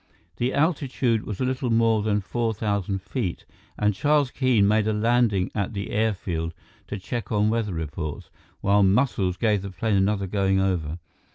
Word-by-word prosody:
The 125 +2 0
altitude 135 -7 +1
was 105 - -5
a 130 - +1
little 130 0 -1
more 115 -1 +3
than 105 -1 +1
four 115 +3 -2
thousand 100 -2 -2
feet, 110 -10 -3 0.3
and 105 0 +2
Charles 145 +4 +2
Keene 125 -7 +3
made 110 0 +2
a 110 - +1
landing 105 -3 +2
at 100 +1 -2
the 100 0 -4
airfield 90 -6 -1 0.3
to - - -4
check 115 +4 -5
on 105 0 +2
weather 110 -5 -1
reports, 80 -1 -5 0.3
while 100 +1 +3
Muscles 95 -3 +2
gave 105 -4 +1
the 100 - -6
plane 100 +3 -1
another 100 +1 +1
going 95 0 +1
over. 85 -5 -1
105 Hz, 170 wpm, -25 LUFS, 95-115 Hz, 0.3 s, more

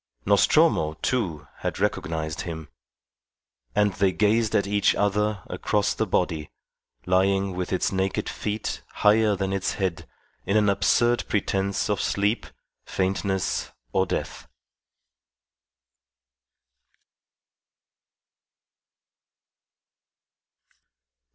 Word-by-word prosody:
Nostromo, 75 0 +4
too, 85 - -1
had - - -3
recognized 80 -1 -2
him. 80 -4 -6 1.1
And 105 -1 +3
they 95 +1 +2
gazed 110 +3 +2
at 100 - +3
each 100 0 +2
other 105 -1 0
across - - 0
the - - -1
body, 80 -4 -1 0.6
lying 95 +1 +2
with 90 0 -3
its 95 - +1
naked 95 0 -1
feet 105 +1 -3 0.2
higher 105 0 +5
than 95 0 -2
its 95 -1 -1
head, 95 -4 -3 0.4
in 100 +3 +1
an 105 -1 +4
absurd 120 +4 +2
pretence 100 -1 0
of 105 -3 0
sleep, 100 +3 0 0.4
faintness, 95 0 -1 0.2
or - - +2
death. - - -4
95 Hz, 90 wpm, -25 LUFS, 90-105 Hz, 1.1 s, higher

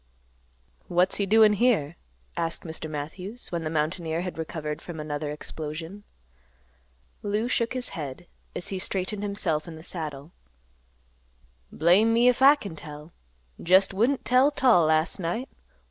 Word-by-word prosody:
"What's 180 +2 +2
he 200 - 0
doin' 215 +1 +6
here?" 200 - +2 0.4
asked 165 0 -2
Mr. 160 -1 -5
Matthews, 180 +10 -5
when 170 -2 -2
the 155 - -2
mountaineer 160 +1 -1
had 180 -2 -5
recovered 155 -2 -4
from 170 -3 -8
another 150 0 -3
explosion. 160 +6 -7 1.2
Lou 210 +3 -1
shook 235 -1 0
his 255 -1 -1
head, 150 +2 -6 0.3
as 175 - -4
he 190 - -3
straightened 195 +2 -2
himself 185 -7 -1
in 165 - -8
the 160 - -11
saddle. 155 -4 -6 1.4
"Blame 190 +8 +4
me 240 +1 +5
'f 250 - 0
I 280 +2 +9
kin 200 - -8
tell. 150 +1 -10 0.5
Jest 190 +3 +4
wouldn't 240 +8 +1
tell 255 +3 +5
't 285 -2 -4
all 180 -11 +6
last 155 +4 +2
night. 190 +9 -3
175 Hz, 145 wpm, -26 LUFS, 155-210 Hz, 1.4 s, I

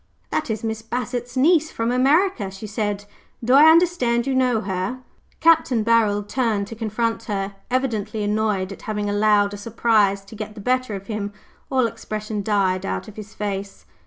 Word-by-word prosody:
"That 305 - -1
is 220 -1 -3
Miss 220 -1 -3
Bassett's 245 +2 -4
niece, 315 +3 +4
from 230 -3 -2
America," 270 - +2
she 195 +3 -9
said. 205 -1 -3 0.4
"Do 245 +3 +2
I 295 +4 +8
understand 320 -9 +3
you 270 - 0
know 250 -4 +2
her?" 195 +6 -3 0.4
Capt. 330 -1 +5
Barold 220 -3 +2
turned 220 -4 0
to 225 - -7
confront 225 +1 -2
her, 200 -1 -3 0.2
evidently 220 -5 -1
annoyed 205 -2 0
at 195 - -9
having 210 -1 -1
allowed 205 -1 +3
a - - -5
surprise 205 -2 +1
to 210 - -12
get 215 0 -7
the - - -9
better 255 0 0
of 195 0 -7
him. 205 -1 -4 0.4
All 260 -2 +2
expression 215 -1 -4
died 195 -3 +1
out 195 - -3
of 215 - -11
his 215 0 -10
face. 200 -1 -5
220 Hz, 175 wpm, -22 LUFS, 205-250 Hz, 0.4 s, I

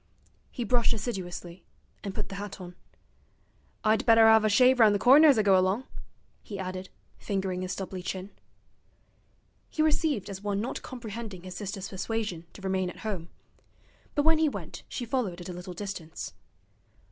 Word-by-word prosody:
He 245 - -4
brushed 235 +1 +2
assiduously, 185 -5 -5 0.4
and 200 -2 -5
put - - -3
the - - -7
hat 205 -1 -7
on. 180 -1 -8 1.1
'I'd 220 +2 +3
better 225 -2 +7
'ave 220 -1 +6
a - - +2
shave 250 +5 +5
round 215 -3 +7
the - - +3
corner 275 +9 +7
as 280 -5 +6
I 215 - +4
go 195 -2 +5
along,' 190 +6 +2 0.6
he 205 - -7
added, 185 0 -5 0.3
fingering 190 -2 -2
his 185 0 -3
stubbly 190 -1 -5
chin. 190 +2 -5 1.4
He 310 - 0
received 300 - +1
as 195 -2 -6
one 205 -1 -1
not 230 +5 -3
comprehending 225 -6 -7
his 185 -1 -7
sister's 200 -1 -5
persuasion 190 -4 -3
to 195 - -12
remain 190 -1 0
at - - -10
home; 180 -6 -3 0.9
but 290 - +2
when 320 -1 +5
he 315 -1 +4
went - - -7
she 245 - -4
followed 220 -8 -1
at 175 - -8
a - - -4
little 180 0 -7
distance. 180 -4 -6
200 Hz, 170 wpm, -28 LUFS, 185-230 Hz, 1.4 s, better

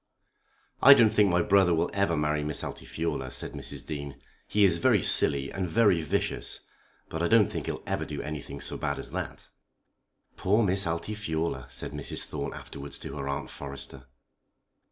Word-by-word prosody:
"I 140 - +10
don't 115 -5 +5
think 105 -2 +4
my 85 -1 +2
brother 95 -3 +4
will 80 +2 0
ever 100 -5 +1
marry 75 0 0
Miss 75 0 -3
Altifiorla," 85 +1 -4
said - - -4
Mrs. - - -5
Dean. 70 -2 -6 0.3
"He 105 - +2
is 85 -4 +4
very - - +3
silly 70 -1 +5
and 95 -2 -2
very 100 -4 +3
vicious, 80 - -2 0.5
but 80 - -5
I 85 - +2
don't 110 0 +5
think - - -5
he'll - - -4
ever - - -2
do - - -6
anything 75 -3 -6
so - - -3
bad 70 -2 -2
as - - -7
that." - - -6 0.9
"Poor 105 +5 +2
Miss 95 -1 +2
Altifiorla!" 85 - -3
said 65 - -2
Mrs. 75 -1 -2
Thorne 70 -2 -5
afterwards 70 0 -7
to 70 - -6
her 70 -1 -4
Aunt 70 +1 -4
Forrester. 70 -1 -6
80 Hz, 175 wpm, -28 LUFS, 70-100 Hz, 0.9 s, I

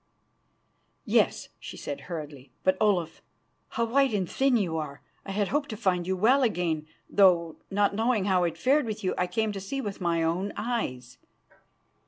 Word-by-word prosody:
"Yes," - - +2
she - - -9
said 145 - -5
hurriedly. 150 -5 -7
"But, 185 0 +3
Olaf, 190 -6 +1 0.5
how 230 - -1
white 265 0 +2
and 190 -3 0
thin 265 +3 +2
you 180 -7 -1
are. 145 -3 -6 0.2
I - - -4
had 200 0 0
hoped 290 0 0
to 215 - -5
find 180 -3 0
you 190 0 0
well 245 +8 +4
again, 170 -9 0 0.2
though, 175 -5 +4
not 200 +1 +2
knowing 220 -1 +1
how 185 -3 +3
it 165 -1 -2
fared 265 - +2
with 215 -2 -4
you, 185 - +1
I 180 - 0
came 215 +4 0
to 200 - -5
see 270 +8 -4
with 205 -6 -5
my 170 -2 +1
own 180 +5 -1
eyes." 200 - -3
195 Hz, 180 wpm, -27 LUFS, 170-220 Hz, 0.5 s, well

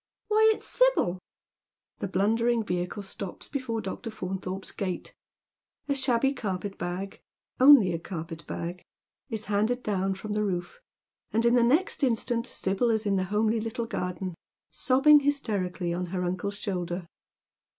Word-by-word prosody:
Why, 440 +1 +5
it's - - -11
Sibyl." - - +2 0.8
The - - -2
blundering 225 +5 +2
vehicle 180 +1 -3
stops 195 -1 -7
before 255 -6 -3
Dr. 200 +4 -5
Faunthorpe's 190 -2 -5
gate; 185 -3 -4 0.7
a 285 - +2
shabby 265 0 +2
carpet 200 -5 -4
bag 185 +3 -4 0.2
— - - -47
only 255 -9 +8
a 165 - -2
carpet 165 -2 -7
bag 175 +2 -5 0.2
— - - -66
is 220 -2 -4
handed 215 +5 0
down 195 -2 0
fi 195 +3 -8
om - - -1
the 210 0 +1
roof, 185 - -3 0.5
and 225 +2 +1
in 235 - +5
the 245 - +5
next 300 +13 +2
instant 240 -1 0
Sibyl 195 +3 0
is 220 -1 +1
in 200 -1 +2
the 185 - 0
homely 215 +3 +1
Mttle 230 +1 -3
garden, 180 -2 -3 0.4
eobbing 270 - +5
hysterically 195 -11 -1
on 180 +1 -2
her 180 +1 -2
uncle's 185 +3 -2
shoulder. 180 -3 -3
205 Hz, 155 wpm, -28 LUFS, 185-240 Hz, 0.8 s, only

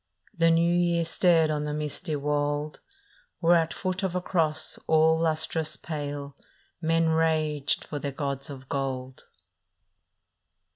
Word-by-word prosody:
" - - -52
The 165 0 +4
New 170 +1 +3
Year 170 -1 +2
stared 165 -2 +3
on 150 -1 -1
the 150 0 -3
misty 150 +2 -2
wold, 145 +1 -1 0.6
Where 170 0 +5
at 165 -1 +2
foot 185 0 -3
of 190 -2 -2
a - - +2
cross 160 -4 0
all 160 0 +4
lustrous 160 -1 0
pale 145 -2 -5 0.5
Men 165 0 +2
raged 155 -3 +1
for 145 - -5
their 140 0 -3
gods 140 0 -4
of 130 -2 -9
gold. 130 -2 -4
155 Hz, 140 wpm, -27 LUFS, 145-165 Hz, 0.6 s, Where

